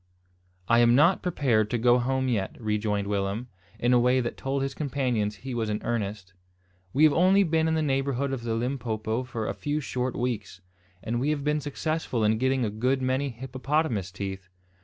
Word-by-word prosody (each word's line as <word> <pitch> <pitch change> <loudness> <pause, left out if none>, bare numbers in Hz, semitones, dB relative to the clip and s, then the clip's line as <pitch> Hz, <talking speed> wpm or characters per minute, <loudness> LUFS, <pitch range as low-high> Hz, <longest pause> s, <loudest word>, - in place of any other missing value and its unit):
"I 115 0 +5
am 120 0 +5
not 165 +7 +4
prepared 125 - +1
to 120 - 0
go 120 +1 +4
home 130 +1 0
yet," 105 -6 -2
rejoined 105 -2 -1
Willem, 100 +4 -2 0.3
in 120 +1 +2
a 125 - +6
way 125 +2 +3
that 120 -2 -2
told 135 0 -2
his 135 0 -2
companions 125 -8 -1
he 130 +3 -7
was 115 -2 -1
in 105 0 -1
earnest. 100 -4 -3 0.6
"We 145 - +2
have 155 -2 +6
only 190 +4 +5
been 160 -2 +1
in 160 - +1
the 160 - +1
neighbourhood 135 -1 0
of 130 - -3
the 115 -1 -2
Limpopo 115 -2 -2
for 120 -4 -4
a - - -1
few 145 +1 -2
short 125 -3 -3
weeks; 110 -7 -3 0.4
and 120 +1 -1
we 140 +4 0
have 150 -2 -1
been 150 +1 +1
successful 145 -4 -2
in 110 +1 +2
getting 130 -1 +1
a 105 - -2
good 125 +5 0
many 130 +2 0
hippopotamus 130 - -2
teeth. 95 -2 -6
125 Hz, 195 wpm, -27 LUFS, 110-140 Hz, 0.6 s, a